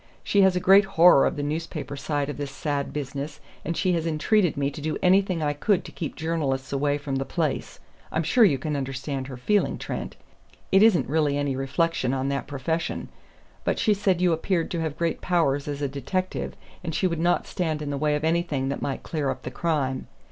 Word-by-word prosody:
She 200 - +3
has 190 -1 +5
a - - +2
great 195 +2 +6
horror 165 -4 +7
of - - -2
the 145 - -3
newspaper 155 0 -4
side 145 0 -2
of 145 - -5
this 145 -1 -4
sad 140 0 -3
business, 145 +1 -5 0.2
and 165 +1 -3
she 185 - +2
had 165 -1 0
entreated 165 +3 +2
me 140 0 0
to 145 - -8
do 155 +1 -2
anything 185 -2 +3
I 145 -1 +1
could 185 +6 +1
to - - -9
keep 155 - -5
journalists 140 -5 -2
away 145 +1 +1
from 140 -2 -3
the 135 - -1
place 155 0 -2 0.3
I'm 160 - 0
sure 230 +10 +4
you 160 -10 +5
can 150 +3 -3
understand 135 0 -3
her 130 -2 -7
feeling, 205 +11 +1
Trent; - - -5 0.6
it 195 - +6
isn't 215 -6 +5
really 145 0 +1
any 145 -2 0
reflection 135 0 0
on 135 +1 -1
that 140 0 -2
profession. 145 +4 -3 0.5
But - - 0
she 215 - +3
said 195 -3 +1
you 180 -2 +4
appeared 165 +1 -1
to 170 - -1
have 155 -2 -3
great 170 -1 -1
powers 145 -6 +1
as 145 0 -3
a - - +2
detective, 145 +8 -3 0.3
and 160 -2 -3
she - - +1
would 170 -3 0
not 175 +1 +2
stand 160 -5 -2
in 145 - -3
the - - -1
way 150 +1 +1
of 150 - -3
anything 160 -5 0
that 140 - -3
might 135 - -3
clear 150 -4 -2
up 130 -1 -4
the 125 - -5
crime. 135 -4 -1
150 Hz, 220 wpm, -25 LUFS, 140-170 Hz, 0.6 s, horror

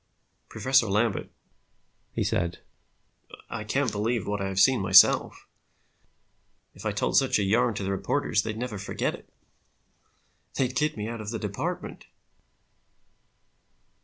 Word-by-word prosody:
"Professor 130 -3 +2
Lambert," 105 +1 0 0.8
he - - -2
said, 85 0 -1 0.9
"I 105 - -4
can't 130 +3 0
believe 110 +2 -1
what 105 0 -2
I 95 - -1
have 95 0 -2
seen 130 +3 +4
myself. 95 0 +5 1.3
If - - -6
I - - 0
told - - 0
such - - +3
a 105 - 0
yarn 110 +3 +2
to 100 - -4
the 95 - -2
reporters, 100 +4 0
they'd 110 0 -5
never 115 -4 -4
forget 100 - -2
it. - - -12 1.3
They'd 130 -1 -1
kid 150 +1 0
me 105 0 -4
out 115 -1 -5
of 105 - -6
the 115 - -3
department." 105 -2 -5
105 Hz, 135 wpm, -26 LUFS, 100-120 Hz, 1.3 s, myself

